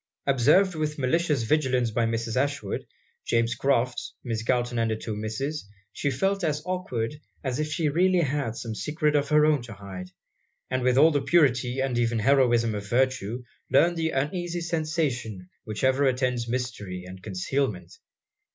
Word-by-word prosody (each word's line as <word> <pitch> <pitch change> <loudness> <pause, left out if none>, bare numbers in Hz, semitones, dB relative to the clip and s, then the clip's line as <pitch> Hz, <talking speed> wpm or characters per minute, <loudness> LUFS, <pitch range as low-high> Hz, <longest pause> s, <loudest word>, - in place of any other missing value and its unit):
Observed 145 +9 +4
with 155 -1 -2
malicious 145 0 +1
vigilance 130 -2 +1
by 115 +1 +1
Mrs. 115 0 -2
Ashwood, 140 +2 -1 0.4
James 115 0 +1
Crofts, 125 -3 0
Miss 115 -3 -2
Galton, 120 0 0
and 115 0 +1
the 110 - 0
two 110 0 -5
Misses, 110 +5 -4 0.2
she 145 - -1
felt 195 +9 0
as 150 -2 0
awkward 150 -7 -3 0.2
as 130 0 -2
if 155 0 -2
she 160 0 0
really 180 +4 +3
had 140 -6 -1
some 115 -1 -5
secret 150 +5 0
of 145 -1 +1
her 150 0 +5
own 150 -3 +3
to 120 -2 -9
hide; 95 -3 -8 0.6
and 130 0 0
with 125 0 +2
all 155 +4 +7
the 145 -2 +1
purity 130 -4 +2
and 130 -3 0
even 120 -1 +1
heroism 120 -1 +3
of 105 0 -5
virtue, 125 -2 0 0.3
learned 170 +6 +4
the 160 -1 0
uneasy 175 +5 -2
sensation 155 - -2 0.2
which 110 +1 -5
ever 130 +1 +3
attends 125 -2 0
mystery 115 -7 -4
and 95 +1 -10
concealment. 95 -1 -3
130 Hz, 165 wpm, -26 LUFS, 115-150 Hz, 0.6 s, all